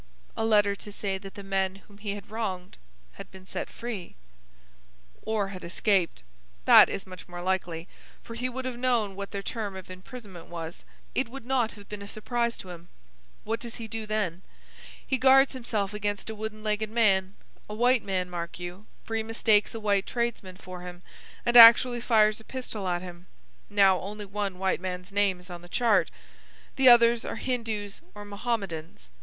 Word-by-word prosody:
"A - - -1
letter 205 -2 +4
to 205 - -9
say 195 -1 -3
that 195 0 -11
the 200 - -8
men 195 -1 0
whom 200 +1 -18
he 205 -1 -3
had 205 0 -11
wronged 190 -5 -4 0.3
had 65 - -11
been 190 -1 -14
set - - -5
free." 225 -7 -6 1.1
"Or 215 -3 -1
had 185 -2 -8
escaped. 180 - +1 0.4
That - - +9
is 195 - -4
much 185 -2 -11
more 175 0 -7
likely, 175 -2 -2 0.4
for 230 - -9
he 250 +2 -2
would 260 +1 -5
have 250 -2 -4
known 235 -6 +1
what 200 0 -5
their 200 0 -5
term 210 -4 -4
of 185 -1 -9
imprisonment 185 -1 -10
was. 165 -1 -7 0.3
It - - 0
would 270 -1 -9
not 245 -3 +1
have 205 -2 -14
been 210 -1 -7
a 200 - -8
surprise 235 +3 -1
to 185 - -9
him. 170 0 -11 0.5
What 225 +1 -2
does 235 -1 -6
he 230 -2 -6
do 220 0 -5
then? 205 -5 -1 0.6
He 265 -2 0
guards 270 +1 +6
himself 215 -5 -2
against 205 0 -3
a - - -7
wooden 215 0 -6
legged 215 0 0
man,—a 210 -2 0
white 245 +2 +3
man, 185 -2 -1
mark 175 -1 -6
you, 180 +4 -8 0.2
for 225 - -4
he 225 - +1
mistakes 220 -1 +2
a - - -3
white 200 -2 +1
tradesman 235 -6 -3
for 185 -2 -9
him, 180 0 -9 0.4
and 240 - +1
actually 240 +1 +9
fires 215 -3 +4
a - - -14
pistol 220 -6 -5
at 175 0 -1
him. 175 0 -10 0.4
Now, 195 -2 +5
only 205 +2 -6
one 200 -1 -3
white 190 -1 0
man's 180 0 -5
name 200 -2 +2
is 180 +1 -11
on 175 -1 -7
the 175 - -14
chart. 230 +1 +3 0.7
The 265 -1 +7
others 235 -1 +6
are - - -4
Hindoos 225 -5 -3
or 205 0 -8
Mohammedans. 195 - -4
205 Hz, 185 wpm, -28 LUFS, 185-225 Hz, 1.1 s, That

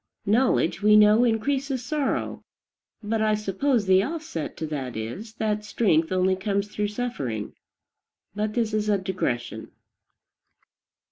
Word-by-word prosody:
Knowledge, 215 -5 +2
we 210 +1 +6
know, 210 +2 +6
increases 260 +2 0
sorrow; 295 +1 -2 0.6
but 220 +1 -1
I 215 -1 +3
suppose 210 +3 0
the 190 0 +5
offset 295 - -4
to 160 - -3
that 135 -6 -4
is, 155 - -6
that 210 -2 -1
strength 175 -7 +1
only 185 0 +2
comes 200 +1 -2
through 210 0 -2
suffering. 205 - -4 0.8
But 210 +1 -2
this 225 -3 0
is 210 0 0
a 205 - +3
digression. 120 - -3
210 Hz, 130 wpm, -25 LUFS, 185-225 Hz, 0.8 s, we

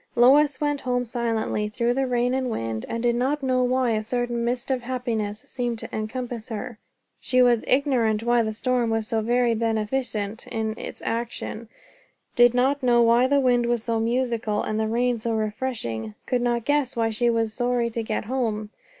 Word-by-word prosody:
Lois 265 +3 +5
went 290 -1 0
home 245 -1 0
silently, 225 -3 -1
through 235 +2 0
the 270 +1 0
rain 245 0 +1
and 260 -1 0
wind, 115 - -3
and 230 +1 -3
did 240 -1 +3
not 270 +4 0
know 255 -1 +2
why 250 -1 +1
a 215 -1 +1
certain 240 +1 -2
mist 245 +2 -2
of 260 -1 0
happiness 235 -4 -3
seemed 240 -2 -3
to - - -7
encompass 235 +1 -4
her. 225 0 -6 0.4
She 255 -1 +3
was 240 -2 +3
ignorant 245 -6 +2
why 240 0 +3
the 220 -1 -1
storm 245 +1 0
was 225 -1 -1
so 225 0 0
very 240 +1 +2
beneficent 220 -1 -2
in 220 -1 -2
its - - -8
action; 230 -1 -4 0.7
did 240 0 +5
not 270 +3 +2
know 240 -2 +4
why 235 +2 +4
the 285 +1 +3
wind 245 -2 +2
was 240 -2 0
so 230 -1 0
musical 230 -2 0
and 215 - -2
the 220 - 0
rain 240 +1 +1
so 225 +1 -1
refreshing; 210 - -3
could 250 -1 0
not 240 -1 0
guess 290 -3 +1
why 225 -1 +1
she 235 +2 +1
was 225 -2 0
sorry 245 -1 0
to 230 - -2
get 220 -1 -3
home. 220 -4 -2
235 Hz, 190 wpm, -24 LUFS, 220-250 Hz, 0.7 s, Lois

